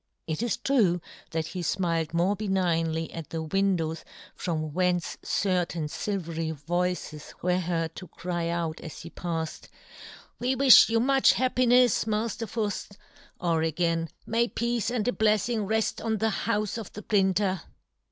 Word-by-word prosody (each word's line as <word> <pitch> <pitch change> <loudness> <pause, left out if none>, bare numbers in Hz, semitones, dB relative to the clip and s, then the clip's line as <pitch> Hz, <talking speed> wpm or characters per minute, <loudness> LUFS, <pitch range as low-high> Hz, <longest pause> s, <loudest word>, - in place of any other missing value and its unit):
It 160 +4 -3
is 240 -3 0
true 230 -9 +2 0.3
that 160 -1 -2
he 180 - -6
fmiled 165 -2 0
more 175 +4 +2
benignly 170 -5 0
at 165 -2 -7
the 160 -1 -3
win 195 +4 +2
dows 160 -1 -3 0.3
from 155 -3 -3
whence 180 -1 0
certain 180 -4 0
filvery 165 -2 -3
voices 175 0 -3
were 180 0 +2
heard 165 -2 -2
to 185 - -8
cry 175 +1 -3
out 170 -2 -2
as 155 - -8
he 170 - -9
pafled, 165 -2 -4 0.4
" - - -17
We 255 +2 +1
wifh 265 -3 +8
you 225 0 +2
much 270 +2 +4
happi 255 -1 +2
nefs, 245 -2 +4
Mafter 220 +1 -1
Fuft 205 -2 -3 0.2
!" - - -27
Or 165 -1 +2
again, 165 0 0 0.2
"May 230 +1 +1
peace 235 -1 -1
and 240 -3 -1
a - - +3
bleffing 215 -1 +1
reft 220 0 0
on 220 -1 0
the 220 +2 +1
houfe 215 -1 0
of 220 - -8
the 210 - -8
printer 190 -3 +2
185 Hz, 160 wpm, -27 LUFS, 165-220 Hz, 0.4 s, wifh